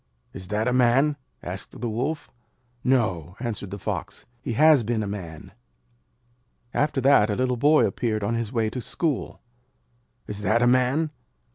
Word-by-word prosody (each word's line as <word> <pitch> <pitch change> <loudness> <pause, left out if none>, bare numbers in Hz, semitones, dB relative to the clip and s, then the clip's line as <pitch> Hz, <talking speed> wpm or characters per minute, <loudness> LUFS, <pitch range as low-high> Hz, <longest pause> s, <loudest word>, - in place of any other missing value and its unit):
'Is 95 -1 -9
that 105 +4 -1
a 125 - +2
Man?' 130 +4 +4 0.3
asked - - -6
the 120 - -2
Wolf. 130 +8 -3 0.5
'No,' 95 - +1
answered 115 -5 -4
the 100 - -6
Fox. - - -5 0.2
'He 125 - -3
has 150 +2 +6
been 110 -1 -1
a - - -3
Man.' 85 -6 -7 1.2
After 145 -2 +1
that, 130 -5 +5
a 105 - 0
little 125 +1 0
boy 145 +5 +4
appeared 110 -4 -1
on 105 +3 0
his 115 -2 -2
way 115 -3 0
to 125 - -4
school. 150 +4 -2 0.8
'Is 105 0 -6
that 110 +4 +2
a - - +5
Man?' 130 +5 +2
120 Hz, 160 wpm, -25 LUFS, 105-130 Hz, 1.2 s, has